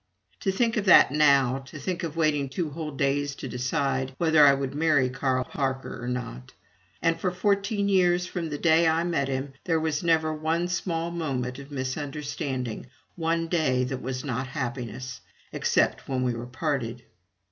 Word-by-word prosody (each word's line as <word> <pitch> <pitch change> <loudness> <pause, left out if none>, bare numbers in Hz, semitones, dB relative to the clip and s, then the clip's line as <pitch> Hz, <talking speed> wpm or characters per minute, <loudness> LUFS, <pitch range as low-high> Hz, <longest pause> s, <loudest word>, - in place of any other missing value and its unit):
To 195 - 0
think 230 +4 +1
of 210 - 0
that 185 - +7
now 140 -3 +4
to 155 - -9
think 175 +3 -3
of 165 -2 -5
waiting 150 -4 +1
two 155 +2 -3
whole 155 +1 -5
days 140 0 0
to - - -6
decide 130 +1 -1
whether 160 -3 +5
I 140 -1 +7
would 135 -1 -3
marry 145 -4 +2
Carl 130 -1 0
Parker 130 -2 -3
or - - -4
not!! 120 - -5 0.5
And 165 0 +2
for 185 - 0
fourteen 200 +2 0
years 180 -2 +3
from 170 -2 -4
the 145 - -3
day 165 +1 +4
I 160 +1 +2
met 165 -6 0
him, 135 +1 -3
there 165 -3 +2
was 155 -2 -1
never 160 -2 +2
one 160 +3 -1
small 170 -2 -2
moment 135 -6 -3
of 140 0 -10
misunderstanding, 135 -3 -4 0.3
one 165 0 0
day 150 -7 +1
that 130 0 -3
was 130 +1 -4
not 130 -1 -2
happiness 125 -2 -5 0.3
except - - +1
when 130 -1 0
we 125 -1 +1
were 120 +1 -6
parted. 125 -3 -3
145 Hz, 175 wpm, -26 LUFS, 130-165 Hz, 0.5 s, that